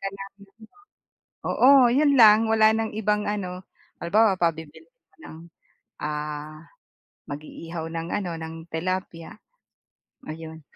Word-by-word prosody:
ka 195 Hz, -, -3 dB
ng 195 Hz, 0 st, -10 dB
ganito 220 Hz, -, -20 dB, 0.7 s
oo, 260 Hz, -2 st, +5 dB
yun 285 Hz, +1 st, +3 dB
lang, 220 Hz, -1 st, +7 dB
wala 220 Hz, -1 st, +5 dB
ng 225 Hz, -1 st, -2 dB
ibang 210 Hz, -1 st, 0 dB
ano. 185 Hz, -3 st, -4 dB, 0.4 s
Halimbawa 205 Hz, +3 st, +3 dB
pabibili 160 Hz, -, -3 dB
ka -, -, -39 dB
ng 160 Hz, -, -11 dB, 0.6 s
ah, 150 Hz, +1 st, -5 dB, 0.6 s
mag-iihaw 160 Hz, +3 st, -7 dB
ng 165 Hz, 0 st, -5 dB
ano, 195 Hz, -4 st, -2 dB
ng 160 Hz, 0 st, -7 dB, 0.2 s
tilapia, 170 Hz, 0 st, -4 dB, 1.0 s
ayun.' 160 Hz, 0 st, -8 dB
185 Hz, 115 wpm, -24 LUFS, 160-220 Hz, 1.0 s, lang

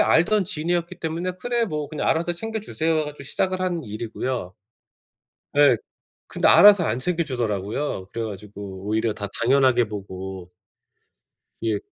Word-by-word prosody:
알던 195 Hz, +5 st, +4 dB
지인이었기 170 Hz, +2 st, -1 dB
때문에 165 Hz, +3 st, -2 dB
그래 240 Hz, +3 st, 0 dB
뭐 150 Hz, -5 st, -3 dB
"그냥 150 Hz, -1 st, -2 dB
알아서 170 Hz, +2 st, +1 dB
챙겨주세요." 200 Hz, -4 st, -1 dB
해 155 Hz, -, -1 dB
가지고 150 Hz, -1 st, -8 dB
시작을 185 Hz, +6 st, 0 dB
한 175 Hz, -3 st, -1 dB
일이고요. 110 Hz, -1 st, -4 dB, 1.0 s
예. 145 Hz, -4 st, +6 dB, 0.5 s
근데 -, -, 0 dB
알아서 200 Hz, -3 st, +8 dB
안 120 Hz, -3 st, 0 dB
챙겨주더라고요. 125 Hz, -, -2 dB
그래 115 Hz, 0 st, -3 dB
가지고 100 Hz, -2 st, -8 dB
오히려 110 Hz, +1 st, +1 dB
다 105 Hz, -1 st, -5 dB, 0.2 s
당연하게 130 Hz, -2 st, +4 dB
보고. 95 Hz, -3 st, -7 dB, 1.1 s
예. 110 Hz, -2 st, 0 dB
140 Hz, 325 characters per minute, -23 LUFS, 105-170 Hz, 1.1 s, 알아서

